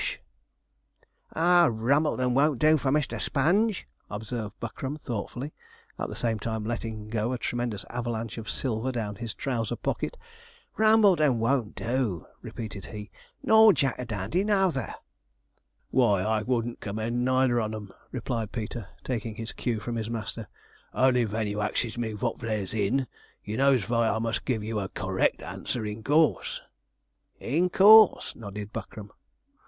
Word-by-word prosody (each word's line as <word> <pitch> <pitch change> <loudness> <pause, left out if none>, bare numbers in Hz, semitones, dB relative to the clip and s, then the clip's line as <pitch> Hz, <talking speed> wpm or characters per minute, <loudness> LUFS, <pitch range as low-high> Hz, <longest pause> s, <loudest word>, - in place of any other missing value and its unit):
'Ah, 175 +1 +5
Rumbleton 130 +2 +1
won't 140 +1 +3
do 155 +5 +5
for 135 - 0
Mr. 150 +1 0
Sponge,' 190 +9 +1 0.2
observed 110 0 -5
Buckram, 130 +5 -5
thoughtfully, 125 +2 -5 0.5
at - - -2
the - - -6
same 115 -2 -1
time 110 0 -3
letting 110 -2 -4
go 110 +2 -1
a - - -1
tremendous 120 -4 -2
avalanche 115 -2 -3
of 110 - -7
silver 125 0 -1
down 105 -5 -4
his 115 -1 -5
trouser 120 -4 -2
pocket, - - -3 0.6
'Rumbleton 200 - +5
won't 115 -1 0
do,' 115 - -1 0.2
repeated 110 -3 -7
he, 105 -2 -8 0.3
'nor 220 -1 +7
Jack 135 -7 +1
a 125 - -3
Dandy 110 - -1
nouther.' 190 - +1 1.0
'Why, 105 -7 +3
I 110 +1 +1
wouldn't 120 0 -1
commend 110 +4 -2
neither 130 -1 +3
on 110 0 -3
'em,' 105 -3 -8 0.2
replied 115 -4 -3
Peter, 110 -2 -5 0.2
taking 115 -3 -3
his 115 +1 -6
cue 120 -4 -2
from 115 +3 -4
his 110 -1 -3
master, 110 -1 -5 0.5
'only 125 -2 +4
ven 110 +1 -2
you 105 0 -2
axes 115 +2 -1
me 115 -2 -3
vot 115 +2 -2
there's 110 -4 -3
in, 115 +5 +1 0.4
you 105 - -4
knows 135 -2 +4
vy 115 0 +2
I 105 - 0
must 115 -1 -2
give 115 -5 -1
you 110 0 -2
a 95 -1 -4
cor 95 0 -5
rect 95 - +1
answer, 115 -3 -4
in 105 +1 -5
course.' 150 +3 +2 0.8
'In 170 +8 +1
course,' 215 +3 +7
nodded 105 -1 -7
Buckram. 105 -1 -7
115 Hz, 150 wpm, -27 LUFS, 110-135 Hz, 1.0 s, nor